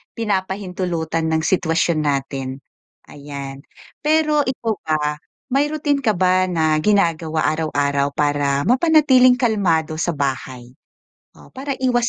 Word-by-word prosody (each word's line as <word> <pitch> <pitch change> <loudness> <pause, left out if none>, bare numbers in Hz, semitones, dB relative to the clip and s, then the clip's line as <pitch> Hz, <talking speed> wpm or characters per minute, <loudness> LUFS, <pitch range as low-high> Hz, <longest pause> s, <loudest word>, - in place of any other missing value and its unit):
pinapahintulutan 185 -6 -2
ng 160 - +2
sitwasyon 165 -2 +1
natin, 135 -2 -3 0.5
ayan. 140 -1 -8 0.4
Pero 300 -1 +2
ikaw 235 -4 -2
ba 150 -1 -1 0.4
may 285 +3 +1
routine 290 -2 -1
ka 220 - +3
ba 185 0 +3
na 160 -2 +2
ginagawa 165 -6 +1
araw-araw 145 -3 0
para 145 -1 0
mapanatiling 260 -2 +4
kalmado 180 -10 +1
sa 175 - 0
bahay, 130 -3 -4 0.6
o - - -17
para 275 +1 -4
iwas 245 -2 +1
170 Hz, 115 wpm, -20 LUFS, 145-245 Hz, 0.6 s, mapanatiling